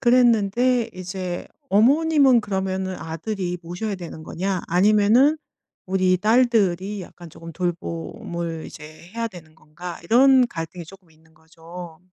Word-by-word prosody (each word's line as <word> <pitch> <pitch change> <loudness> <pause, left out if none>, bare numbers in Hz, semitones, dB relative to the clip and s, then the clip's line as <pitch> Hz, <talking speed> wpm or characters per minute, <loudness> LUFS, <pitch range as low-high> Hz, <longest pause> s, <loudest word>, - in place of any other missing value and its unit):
그랬는데 240 -1 +3
이제 185 -1 -5 0.2
어머님은 275 +3 +4
그러면은 190 -2 -2
'아들이 175 +3 -4
모셔야 180 +5 -4
되는 170 -4 -8
거냐 185 +3 -3
아니면은 210 - +4 0.5
우리 185 -1 +2
딸들이 210 -4 +2
약간 175 -1 -12
조금 165 +2 -11
돌봄을 170 -1 -4
이제 150 - -11 0.3
해야 230 0 -1
되는 160 -5 -14
건가?' 170 +4 -9
이런 255 +4 +5
갈등이 165 +1 -6
쪼끔 185 -1 -16
있는 160 0 -26
거죠. 165 +1 -12
185 Hz, 290 characters per minute, -23 LUFS, 170-225 Hz, 0.5 s, 이런